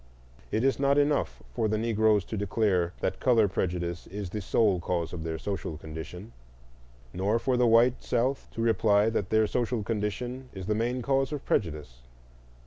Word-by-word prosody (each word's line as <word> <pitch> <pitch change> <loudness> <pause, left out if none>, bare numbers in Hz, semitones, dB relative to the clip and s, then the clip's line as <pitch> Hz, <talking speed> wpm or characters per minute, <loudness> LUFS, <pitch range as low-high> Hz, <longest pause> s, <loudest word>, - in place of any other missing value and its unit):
It 110 - 0
is 135 0 +2
not 140 0 +3
enough 145 - +1
for 110 - 0
the 110 0 0
Negroes 110 -2 +2
to - - -5
declare 100 -4 +1
that - - -1
color 115 -5 +4
prejudice 85 -2 -3
is 100 -2 -6
the 105 - -3
sole 100 -1 +2
cause 85 -1 -2
of 85 -2 -5
their 80 -1 -3
social 85 -3 -4
condition, 80 +7 -8 0.8
nor 100 +5 +1
for 125 +2 0
the 125 -1 +3
white 115 +2 +4
South 125 +3 -1
to 115 - -4
reply 110 -1 +3
that 100 -4 -2
their 110 0 +3
social 120 0 -1
condition 120 +5 -3
is 95 -2 -7
the 105 - +1
main 120 +3 -1
cause 135 0 +1
of 145 -2 -5
prejudice. 75 - -2
110 Hz, 175 wpm, -28 LUFS, 90-120 Hz, 0.8 s, color